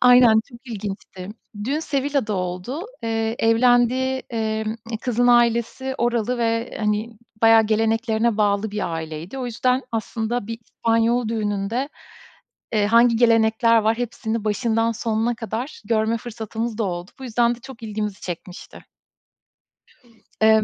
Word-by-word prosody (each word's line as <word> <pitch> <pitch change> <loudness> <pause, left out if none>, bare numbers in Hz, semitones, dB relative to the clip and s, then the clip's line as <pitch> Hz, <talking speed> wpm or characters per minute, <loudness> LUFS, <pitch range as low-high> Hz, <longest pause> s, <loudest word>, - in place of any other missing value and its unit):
Aynen 245 -3 +7
çok 240 +1 -15
ilginçti. 195 -4 -6 0.4
Düğün 285 +5 0
Seville'da 275 -6 -1
oldu. 185 - -4 0.2
Eee, 225 0 -1
evlendiği, 245 +3 +3
emm, 220 -1 -1
ı 225 0 -7
kızın 245 -1 +1
ailesi 240 +2 +2
oralı 240 0 0
ve, 230 0 -1
hani, 210 +1 0 0.3
bayağı 225 0 +7
geleneklerine 225 +1 +1
bağlı 205 0 +1
bir 200 -5 -3
aileydi. 160 +8 -6
O 255 - -3
yüzden 250 +3 +1
aslında 225 0 -2
bir 230 0 -5
İspanyol 230 0 +1
düğününde, 215 +3 -1 0.8
eee, 210 -2 +2
hangi 235 +1 +5
gelenekler 230 0 +4
var 220 +1 +1
hepsini 225 -2 -3
başından 225 +1 +1
sonuna 225 +1 -1
kadar 225 +5 -5
görme 220 +1 +1
fırsatımız 225 0 -5
da 220 - +1
oldu. 175 0 -4
Bu 265 - -8
yüzden 235 0 +2
de 240 - -15
çok 255 -2 -12
ilgimizi 210 -2 -4
çekmişti. 175 +1 -8 1.6
Eee, 220 0 +6
225 Hz, 130 wpm, -22 LUFS, 215-240 Hz, 1.6 s, Aynen